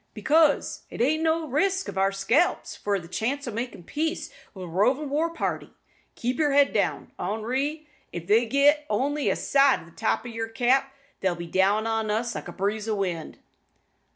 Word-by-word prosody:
"Because 310 -1 +2
it's - - -2
o' 310 +5 +2
no 325 0 +2
use - - -6
to 305 - -8 0.4
risk - - -14
our 195 +1 +3
scalps 245 - +1
for 200 -1 -1
the 170 - -11
chance 260 +10 -2
o' - - -2
makin' 230 -4 -5
peace 315 - -3 0.2
wi' 190 - -7
a - - -6
rovin' 255 - +1
war 315 +3 +1
party. 335 - -4 0.4
Keep 245 +3 -2
yer 295 -2 +2
head 285 0 +4
down, - - -1
Henri! 260 - -2 0.2
If 170 -1 -6
they 225 +5 +3
git 285 +4 +4
only 280 +7 0
a - - +1
sight 275 -1 +3
o' - - -13
the 170 - -17
top 220 +6 -1
o' - - -5
yer 225 -1 -4
cap, 255 +4 +1 0.3
they'll 190 -2 0
be 170 +1 -6
down 195 +5 +2
on 225 -1 -1
us 230 +3 -1
like - - -6
a - - -6
breeze 210 +3 -2
o' 215 - +1
wind." 180 -5 -3
235 Hz, 200 wpm, -26 LUFS, 205-285 Hz, 0.4 s, head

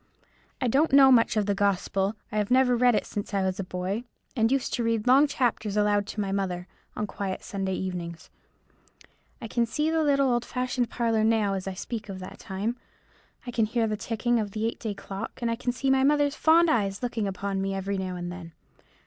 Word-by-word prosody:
I 255 - 0
don't 280 +7 +3
know 270 -1 +8
much 230 -2 +4
of 210 - +2
the 205 - +1
gospel; 195 0 0 0.2
I 215 - 0
have 205 - -1
never 255 -1 +4
read 245 -1 +4
it - - 0
since 205 0 -5
I 195 - +1
was 190 0 -1
a - - -1
boy, 185 +4 -3 0.3
and 225 -1 +2
used 270 -1 0
to 240 - 0
read 230 -2 0
long 270 +4 +6
chapters 230 -6 -1
aloud 205 -1 +2
to 215 - -6
my 200 -2 -1
mother, 185 -3 -2 0.3
on 210 - -2
quiet 195 -2 -4
Sunday 190 -1 -3
evenings; 170 -3 -5 1.1
I 230 - -6
can 235 +1 0
see 300 +7 0
the 325 0 +2
little 275 -3 +3
old 240 0 0
fashioned 250 -1 -2
parlour 230 -2 +1
now 220 -3 +2
as 190 0 -4
I 190 - -4
speak 215 +2 -6
of 190 - -5
that 185 0 -9
time; 210 +4 -3 0.7
I 245 - -5
can 225 -2 +1
hear 230 +1 0
the 215 -1 -1
ticking 230 +2 0
of 210 -2 -2
the 220 0 -2
eight 230 - -2
day 215 -3 -4
clock, 195 +3 -6
and 235 -2 -1
I - - 0
can 245 +1 -2
see 265 +2 0
my 265 0 +3
mother's 290 0 +3
fond 330 +3 +4
eyes 200 -8 0
looking 230 -4 -1
up 195 0 -6
at 200 0 -1
me 195 0 -1
every 195 0 -2
now 185 -1 -3
and 175 0 -5
then. 170 -2 -9
215 Hz, 225 wpm, -27 LUFS, 195-245 Hz, 1.1 s, know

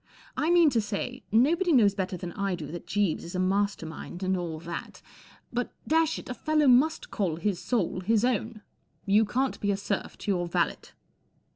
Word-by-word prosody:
I 310 - 0
mean 345 -3 +6
to 230 -3 +2
say, 225 +5 -4
nobody 325 - +3
knows 220 -9 +5
better 190 -2 -3
than 175 0 -6
I 195 0 -2
do 165 -3 -7
that 175 0 -8
Jeeves 205 -5 0
is 170 - -8
a - - -1
master 195 -1 0
mind 175 +3 -8
and 190 0 +1
all 170 -3 -3
that, 170 0 -7 0.5
but, 245 0 -2 0.2
dash 320 0 +2
it, - - -9
a 255 - -3
fellow 305 +2 +1
must 270 +6 +3
call 185 -6 -1
his 180 +2 -1
soul 200 -7 -1
his 220 +4 +2
own* 225 -3 -1 0.4
You 210 +2 +4
can 260 +5 0
t - - -13
be 205 - 0
a 200 - +1
serf 200 0 -3
to 205 - -2
your 175 -2 0
valet. 170 - -1
205 Hz, 200 wpm, -28 LUFS, 185-250 Hz, 0.5 s, mean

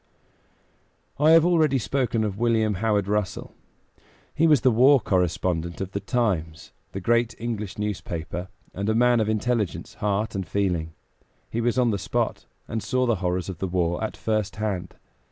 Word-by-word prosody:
I 150 +2 +5
have 165 0 +7
already 160 -6 +3
spoken 115 0 0
of 105 -1 -3
William 115 -2 +2
Howard 100 0 0
Russell. 105 -3 -2 0.8
He 165 - +3
was 150 -6 +5
the 130 - +4
war 130 +5 +6
correspondent 90 -3 -1
of 95 0 -4
the 100 - -2
Times, 95 -8 -2 0.2
the 95 - -5
great 120 +4 +1
English 110 -4 -4
newspaper, 90 -4 -4 0.3
and 100 +2 -2
a 110 - +2
man 120 0 +4
of 110 -1 +1
intelligence, 110 -2 -1
heart 105 +1 -1
and 95 -4 -3
feeling. 85 -3 -1 0.6
He 115 - -1
was 120 +1 0
on 125 -2 +3
the 100 - -1
spot, - - -2 0.2
and 110 - -3
saw 130 +3 0
the 115 -3 +1
horrors 90 0 -1
of 95 -4 -6
the 95 - -1
war 90 +1 0
at 110 - -4
first 110 -3 -1
hand. 100 -4 -3
105 Hz, 170 wpm, -25 LUFS, 95-120 Hz, 0.8 s, have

